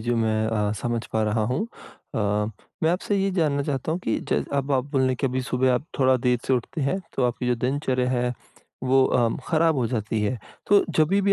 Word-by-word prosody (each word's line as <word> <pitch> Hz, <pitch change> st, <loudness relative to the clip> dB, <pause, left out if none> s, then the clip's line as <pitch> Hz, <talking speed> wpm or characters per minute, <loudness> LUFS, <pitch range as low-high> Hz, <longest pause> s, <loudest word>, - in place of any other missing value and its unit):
जो 120 Hz, +2 st, 0 dB
मैं 110 Hz, -1 st, +1 dB
अ, 105 Hz, -2 st, 0 dB
समझ 120 Hz, -1 st, -1 dB
पा 110 Hz, -, +1 dB
रहा 110 Hz, +1 st, +1 dB
हूँ, 175 Hz, -, -1 dB, 0.5 s
अ, -, -, 0 dB, 0.6 s
मैं 160 Hz, -, +4 dB
आपसे 190 Hz, +3 st, 0 dB
ये 195 Hz, 0 st, +1 dB
जानना 150 Hz, -6 st, +1 dB
चाहता 140 Hz, +2 st, -2 dB
हूँ 170 Hz, -, -1 dB
कि -, -, +1 dB
च -, -, +1 dB
अब 140 Hz, 0 st, 0 dB
आप 130 Hz, -1 st, +2 dB
बोलें 130 Hz, -2 st, +2 dB
कि 135 Hz, -, 0 dB
अभी 130 Hz, 0 st, -1 dB
सुबह 130 Hz, 0 st, +1 dB
आप 125 Hz, -, -1 dB
थोड़ा 130 Hz, -1 st, +4 dB
देर 125 Hz, 0 st, +1 dB
से -, -, +1 dB
उठते 130 Hz, +6 st, -1 dB
हैं 140 Hz, +7 st, 0 dB, 0.2 s
तो 130 Hz, -, +2 dB
आपकी 125 Hz, +1 st, -1 dB
जो 125 Hz, -, +3 dB
दिनचर्या 130 Hz, +1 st, 0 dB
है 125 Hz, -1 st, 0 dB, 0.5 s
वो 130 Hz, +1 st, +4 dB
अम, 115 Hz, -2 st, +2 dB
खराब 165 Hz, 0 st, +3 dB
हो 125 Hz, -3 st, +1 dB
जाती 110 Hz, -1 st, -2 dB
है। 110 Hz, +4 st, -1 dB, 0.3 s
तो 205 Hz, 0 st, +5 dB
जभी 160 Hz, +6 st, +4 dB
भी 200 Hz, 0 st, +4 dB
130 Hz, 225 wpm, -25 LUFS, 120-145 Hz, 0.6 s, तो